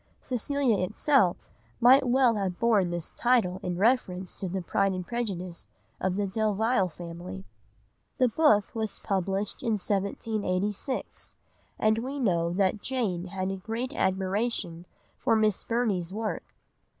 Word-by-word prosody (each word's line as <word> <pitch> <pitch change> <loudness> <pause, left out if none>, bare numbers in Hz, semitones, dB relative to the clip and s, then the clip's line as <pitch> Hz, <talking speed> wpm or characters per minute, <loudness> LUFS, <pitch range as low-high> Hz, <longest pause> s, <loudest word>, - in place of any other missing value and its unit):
Cecilia 255 -2 0
itself 210 - +2 0.3
might 255 +2 +6
well 250 -1 +4
have 190 -3 -2
borne 215 -6 +3
this 175 -1 -4
title 230 -7 +2
in 180 -1 -3
reference 190 -4 +1
to 190 - -4
the 190 0 -3
pride 195 +3 +1
and 185 -1 -4
prejudice 185 -7 -4 0.3
of 185 -1 0
the 205 0 0
Delvile 215 0 +1
family. 165 - -8 0.7
The 255 - +4
book 225 -5 +3
was 220 -2 -3
published 195 +1 -1
in 230 - 0
1786, 205 +2 -2 0.4
and 215 +1 +2
we 270 +4 -4
know 170 -8 +1
that 195 +3 +1
Jane 210 -10 -1
had 190 +1 -3
a 195 - -3
great 225 +7 -4
admiration 190 - -1 0.3
for - - +2
Miss 215 -3 +2
Burney's 210 -7 0
work. 215 +2 -3
200 Hz, 135 wpm, -28 LUFS, 185-235 Hz, 0.7 s, might